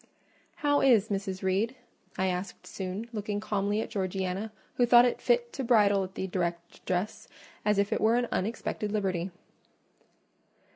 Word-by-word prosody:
"How 290 0 +4
is 225 -6 +4
Mrs. 195 -2 -3
Reed?" 200 +7 +1 0.4
I 190 - +1
asked 185 +1 -3
soon, 190 +4 -5
looking 210 -1 -2
calmly 205 0 0
at - - -6
Georgiana, 190 +1 -2 0.3
who 245 - +5
thought 240 0 +6
fit 480 -1 +1
to 270 - -3
bridle 205 -5 +4
at 190 0 -8
the - - -2
direct 170 -2 -3
address, 185 +3 -3 0.4
as 210 -1 +2
if 200 +2 +2
it - - -1
were 225 +2 +4
an 245 0 +1
unexpected 210 0 -2
liberty. 190 -4 -1
205 Hz, 150 wpm, -29 LUFS, 190-225 Hz, 0.4 s, thought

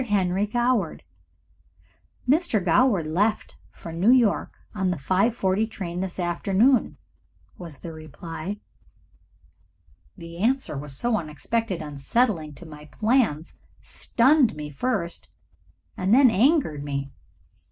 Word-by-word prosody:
Henry 195 -2 +1
Goward." 240 -6 0 1.2
"Mr. 290 -4 +3
Goward 195 -1 +3
left 200 +8 -1
for 165 - -10
New 180 +7 +2
York 245 -5 +3 0.2
on 190 -3 -1
the 180 - -1
5.40 195 - +1
train 180 -5 -5
this 190 -1 -4
afternoon," 195 +8 +1 0.6
was 165 -6 -9
the 165 - -7
reply. 165 +5 -7 1.6
The 170 0 -10
answer, 215 - -1
so 220 - -1
unexpected 175 +3 -3
and 150 - -7
unsettling 155 - 0
to 175 - -12
all 160 - -12
my 150 0 -11
plans, 205 - 0 0.3
stunned 260 - +2
me 150 -1 -7
first 180 - -3 0.7
and 185 +2 -1
then 255 +1 +6
angered 220 - +2
me. 140 -1 -4
190 Hz, 115 wpm, -24 LUFS, 160-230 Hz, 1.6 s, then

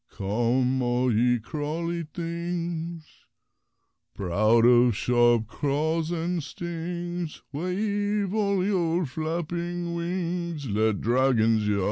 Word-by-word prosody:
Come, 120 +6 0
all 125 0 +1
ye 120 +2 +3
crawly 160 +7 -3
things, 170 -1 -4 1.1
Proud 110 +5 +3
of 120 -1 +5
sharp 120 -2 +3
claws 155 +6 -1
and 170 0 -1
stings, 170 +2 -5
Wave 200 +4 -1
all 200 -3 +1
your 175 -3 +1
flapping 170 +3 -3
wings, 170 -3 -3
Let 110 -1 +1
Dragons 115 -3 +3
yowl! 105 -1 +1
160 Hz, 95 wpm, -26 LUFS, 120-175 Hz, 1.1 s, of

